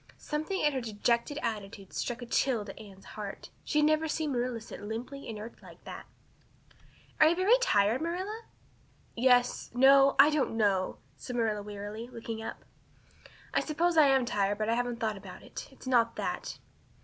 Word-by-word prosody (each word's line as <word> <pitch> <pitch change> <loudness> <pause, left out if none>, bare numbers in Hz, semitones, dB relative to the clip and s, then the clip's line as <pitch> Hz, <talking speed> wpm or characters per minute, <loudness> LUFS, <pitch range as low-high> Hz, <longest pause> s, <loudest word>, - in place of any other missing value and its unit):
Something 310 +6 -3
in 295 -1 +3
her 260 - -1
dejected 235 +5 0
attitude 200 -4 -5
struck 245 0 -3
a - - -6
chill 235 -2 +1
to 195 - -9
Anne's 195 -3 -13
heart. 205 -2 -8
She 300 - -1
had - - +4
never 310 +1 +2
seen 310 -1 -1
Marilla 245 -2 -1
sit 220 - -10
limply 230 +6 -6
inert 220 +1 -8
like - - -15
that. - - -9 1.1
"Are 310 - +8
you 330 - +3
very 375 +6 +4
tired, 215 - +3
Marilla?" 375 +7 -3 0.7
"Yes 245 0 +3
no 270 +2 +6
I 300 - +7
don't 285 -6 0
know," 195 -4 +1 0.2
said 250 - -7
Marilla 220 -3 0
wearily, 205 +2 -7
looking 230 -2 -6
up. 225 - -7 0.9
"I - - +3
suppose 335 +3 0
I 310 -3 +7
am 265 -2 +3
tired 205 -2 0
but 215 +1 -1
I - - +3
haven't 245 0 -1
thought 215 -2 -1
about - - -11
it. - - -8
It's - - -16
not 235 -3 +3
that." - - -4
240 Hz, 175 wpm, -30 LUFS, 215-290 Hz, 1.1 s, Are